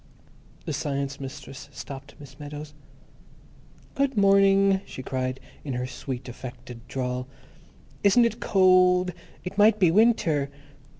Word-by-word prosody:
The - - -3
Science 140 -1 -3
Mistress 135 0 -9
stopped 140 0 -9
Miss 140 -1 -13
Meadows. 150 0 -8 1.2
"Good 275 -3 0
mor 200 0 +6
ning," 195 0 +4
she 130 - -9
cried, 130 0 -3 0.2
in 140 - -4
her 125 0 -2
sweet, 125 0 -6
affected 120 -1 -9
drawl. 125 -1 -3 0.8
"Isn't 205 +4 +5
it 230 0 -1
cold? 185 -1 +4 0.3
It 190 +3 -5
might 215 +1 +6
be 180 -5 +4
win 225 +5 +5
ter." 145 -7 -1
150 Hz, 130 wpm, -26 LUFS, 135-195 Hz, 1.2 s, mor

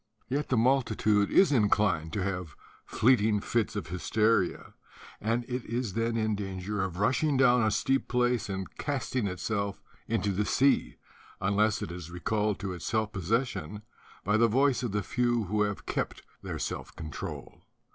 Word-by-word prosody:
Yet 145 +3 -2
the 130 - +2
multitude 110 -4 +2
is 190 -5 +5
inclined 105 - +2
to 100 - -1
have 90 -5 -4 0.3
fleeting 110 -3 +3
fits 115 +1 -1
of 95 -6 -4
hys 90 +1 -5
teria; 110 -4 +1 0.5
and 115 +3 0
it 125 0 -4
is 115 -3 -2
then 115 +1 0
in 110 -1 +1
danger 100 0 -3
of 90 -2 -4
rushing 130 - +2
down 125 -2 +5
a 110 - +3
steep 135 +5 +1
place 125 -3 +1
and 95 -1 -3
casting 130 -5 -1
itself 100 +2 -3 0.2
into 100 +2 0
the 100 +2 0
sea, 135 +6 +2 0.4
unless 105 +2 +1
it - - -5
is 85 -2 -7
recalled 105 +4 -1
to 95 -2 -3
its 85 - -7
self 110 -2 0
possession 105 - -2 0.4
by 105 +3 +2
the 115 +1 +5
voice 130 +1 +2
of 120 -4 -2
the 105 0 -1
few 120 +3 +1
who 105 +2 -1
have 105 -1 -1
kept - - -3 0.2
their - - -5
self - - -5
control. 80 -2 -7
105 Hz, 165 wpm, -29 LUFS, 100-120 Hz, 0.5 s, is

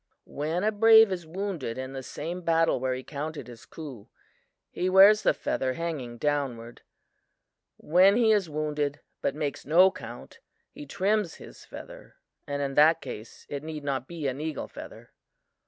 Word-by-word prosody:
"When 160 +6 -3
a 215 - +2
brave 220 0 +7
is 175 -3 -4
wounded 170 - -4
in 130 +1 -6
the 135 - -5
same 165 +7 -6
battle 165 -3 +2
where 130 0 -1
he 130 - -7
counted 150 +2 -6
his 120 -2 -13
coup, 140 -10 -10 0.6
he 185 - -1
wears 200 +3 +7
the - - +4
feather 130 -1 -2
hanging 140 -7 -5
downward. 130 -5 -2 1.0
When 185 +5 +4
he 230 -2 +4
is 200 -6 +2
wounded, 150 -1 -2 0.2
but 140 - -1
makes 150 -2 -3
no 180 +6 +5
count, - - -10 0.3
he 295 0 -10
trims 200 -2 0
his - - -13
feather - - -12 0.3
and 145 0 -2
in 135 -1 -3
that 155 +3 +5
case, 120 -6 -9
it 140 -1 -5
need 155 -1 -7
not 135 -2 -2
be 165 -3 -6
an 135 +2 -3
eagle 155 -2 -4
feather. - - -11
155 Hz, 165 wpm, -27 LUFS, 135-180 Hz, 1.0 s, brave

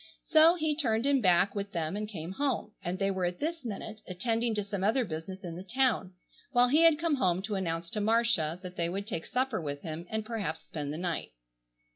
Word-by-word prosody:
So 325 +2 +6
he 315 -3 0
turned 235 -5 +1
him 280 -2 +3
back 185 0 +4
with 200 -1 -4
them 165 0 -1
and 210 0 -3
came 170 -4 -6
home, 270 -1 -1
and 175 +2 -2
they 195 +1 +1
were 190 -2 -1
at 175 0 -2
this 325 +1 -2
minute 220 -1 -6
attending 225 +5 0
to 210 - 0
some 200 -1 -4
other 230 +5 +3
business 175 +2 -6
in 170 -2 -5
the 180 - -7
town, 230 -4 +1 0.4
while 245 0 +5
he 300 +5 +5
had 330 -2 +7
come 320 -2 +1
home 185 -5 +1
to 210 +1 -3
announce 170 -3 -2
to 215 - -1
Marcia 210 -7 +2
that 180 0 -8
they 170 0 +1
would 195 +3 -3
take 180 -7 -4
supper 255 -5 0
with 145 -2 -5
him 165 +2 -6
and 220 0 -2
perhaps 205 -9 -3
spend 145 -2 -4
the 155 - -4
night. 175 - -3
200 Hz, 225 wpm, -30 LUFS, 175-245 Hz, 0.4 s, had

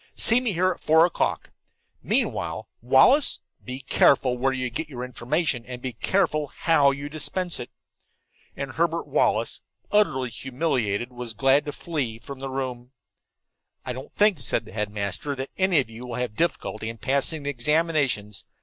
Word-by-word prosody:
"See 230 +2 +4
me 235 -5 -1
here 185 +2 +2
at - - -6
four 160 +2 +5
o'clock. 175 - -1 0.5
Meanwhile, - - -1
Wallace, 135 - +5 0.2
be 130 +1 -6
careful 130 -1 +3
where 130 +2 +1
you 130 -1 -2
get 150 +7 -4
information, 125 +2 -1
and 125 -1 -6
be 125 0 -5
careful 155 - +1
how 145 -1 +3
you 140 +1 -3
dispense 170 +3 -3
it." 120 - -6 0.9
And 140 -1 -4
Herbert 170 +2 0
Wallace, - - +1 0.3
utterly 130 - +2
humiliated, 125 -4 -2
was 120 -2 -6
glad 135 +5 +3
to 145 - -3
flee 140 -8 -3
from 130 +4 -9
the 135 0 -5
room. 130 -1 -5 0.9
"I 125 - -3
don't 130 +2 -9
think," 210 -5 +3
said 115 - 0
the - - -13
headmaster, 105 +5 -2
"that 135 0 -5
any 190 -4 +3
of 125 - -1
you 120 +3 -9
will 120 - -5
have 125 -3 -3
difficulty 115 -9 -2
passing 140 +4 0
the 145 - -1
examinations. 140 -7 0
135 Hz, 160 wpm, -25 LUFS, 125-160 Hz, 0.9 s, four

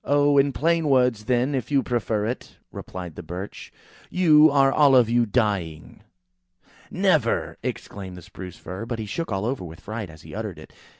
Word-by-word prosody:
"Oh! 145 0 +3
in 140 0 +3
plain 165 +2 +1
words, 125 -5 +2
then, 125 +4 +1
if 130 -3 -2
you 140 -2 +2
prefer 110 -3 -1
it," 120 +3 -5
replied 90 -3 -7
the - - -8
Birch. 90 +4 -8 0.4
"You 155 -4 +6
are 135 -1 +4
all 145 -3 +5
of 120 -3 +5
you 120 -1 +3
dying." 100 -9 -2 0.9
"Never!" - - +1
exclaimed 95 -2 -6
the 90 - -11
Spruce 90 +1 -10
fir; 95 +5 -7
but 120 - -3
he 110 - -4
shook 165 +7 -4
all 95 +1 -1
over 125 -4 -2
with 85 -1 -10
fright 110 -2 -6
as 80 -1 -14
he - - -11
uttered - - -5
it. - - -13
115 Hz, 185 wpm, -24 LUFS, 95-140 Hz, 0.9 s, You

